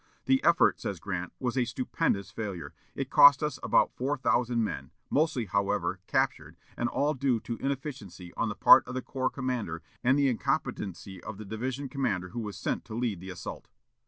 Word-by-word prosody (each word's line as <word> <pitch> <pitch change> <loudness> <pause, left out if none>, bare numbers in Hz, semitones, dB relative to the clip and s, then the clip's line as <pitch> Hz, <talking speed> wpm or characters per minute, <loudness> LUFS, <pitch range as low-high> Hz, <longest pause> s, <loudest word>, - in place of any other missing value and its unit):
"The 265 0 +3
effort," 170 -1 +4
says 95 - -4
Grant, 90 -1 -4
"was 125 -1 -2
a 130 - +3
stupendous 100 -6 -1
failure. 95 -9 -5 0.2
It - - -4
cost 145 0 +8
us 150 - -2
about - - +3
four 140 +3 -1
thousand 120 -2 +1
men, 105 - -4 0.2
mostly, 150 -5 +1
however, 100 -2 0
captured, - - 0 0.2
and 120 - -1
all 145 +4 +1
due 130 -3 +1
to 115 - -5
inefficiency 130 - -5
on - - -1
the - - -4
part - - +8
of 125 - -6
the 130 - -3
corps 130 -2 -1
commander 120 - -3 0.2
and 130 +3 +4
the 140 -1 +3
incompetency 95 -6 -2
of 110 -2 -7
the 110 - -8
division 130 +7 -4
commander 105 -10 -2
who 120 - -5
was 105 -5 -5
sent - - -2
to 110 - -7
lead 115 -6 -1
the 95 +2 -9
assault." 90 -2 -7
120 Hz, 190 wpm, -29 LUFS, 100-135 Hz, 0.2 s, cost